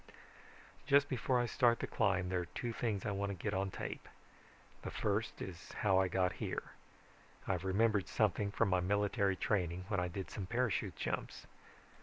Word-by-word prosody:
"Just 140 Hz, 0 st, +5 dB
before 125 Hz, -1 st, +1 dB
I 120 Hz, -, +2 dB
start 120 Hz, 0 st, +3 dB
the -, -, -2 dB
climb 95 Hz, -4 st, +1 dB
there 90 Hz, -1 st, +1 dB
are 90 Hz, -, -2 dB
two 120 Hz, +6 st, -4 dB
things 110 Hz, -3 st, -1 dB
I 105 Hz, -, 0 dB
want 100 Hz, 0 st, -1 dB
to 100 Hz, -, -3 dB
get 100 Hz, +3 st, -3 dB
on 95 Hz, +1 st, 0 dB
tape. -, -, -6 dB, 0.7 s
The -, -, -5 dB
first 105 Hz, +2 st, -1 dB
is 90 Hz, -2 st, -8 dB
how 95 Hz, -3 st, +3 dB
I 95 Hz, -, +3 dB
got 90 Hz, 0 st, +1 dB
here. -, -, -3 dB, 0.8 s
I've 90 Hz, -2 st, 0 dB
remembered 100 Hz, +1 st, +2 dB
something 105 Hz, -1 st, +1 dB
from 100 Hz, -, +1 dB
my 90 Hz, -1 st, +3 dB
military 100 Hz, +1 st, +1 dB
training, 90 Hz, -2 st, 0 dB
when 100 Hz, -3 st, +1 dB
I 90 Hz, -, 0 dB
did 95 Hz, +2 st, -5 dB
some 95 Hz, -3 st, -5 dB
parachute 120 Hz, 0 st, 0 dB
jumps. -, -, -4 dB
100 Hz, 180 wpm, -36 LUFS, 95-110 Hz, 0.8 s, Just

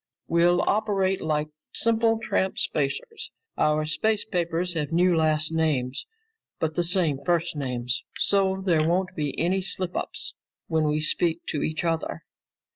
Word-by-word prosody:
We'll 175 Hz, +1 st, +4 dB
operate 195 Hz, -3 st, +1 dB
like 150 Hz, -1 st, 0 dB, 0.3 s
simple 225 Hz, 0 st, +3 dB
tramp 195 Hz, -3 st, 0 dB
spacers. 155 Hz, -, -2 dB, 0.3 s
Our 155 Hz, 0 st, +2 dB
space 215 Hz, +7 st, 0 dB
papers 175 Hz, -1 st, -1 dB
have 150 Hz, -3 st, -2 dB
new 175 Hz, +1 st, +4 dB
last 155 Hz, -1 st, +2 dB
names, 145 Hz, -6 st, 0 dB, 0.5 s
but 160 Hz, -1 st, 0 dB
the 175 Hz, -, +1 dB
same 170 Hz, -5 st, +1 dB
first 170 Hz, 0 st, +1 dB
names, 125 Hz, -3 st, -2 dB, 0.2 s
so 190 Hz, -1 st, +2 dB
there 160 Hz, -4 st, +3 dB
won't 185 Hz, +1 st, 0 dB
be 150 Hz, -3 st, -2 dB
any 185 Hz, +4 st, +1 dB
slip 185 Hz, -1 st, -3 dB
ups -, -, -4 dB, 0.3 s
when 160 Hz, -2 st, +1 dB
we 150 Hz, +1 st, +1 dB
speak 165 Hz, +2 st, 0 dB
to 150 Hz, -, -1 dB
each 160 Hz, +2 st, -2 dB
other. 165 Hz, -1 st, -2 dB
170 Hz, 145 wpm, -26 LUFS, 155-185 Hz, 0.5 s, We'll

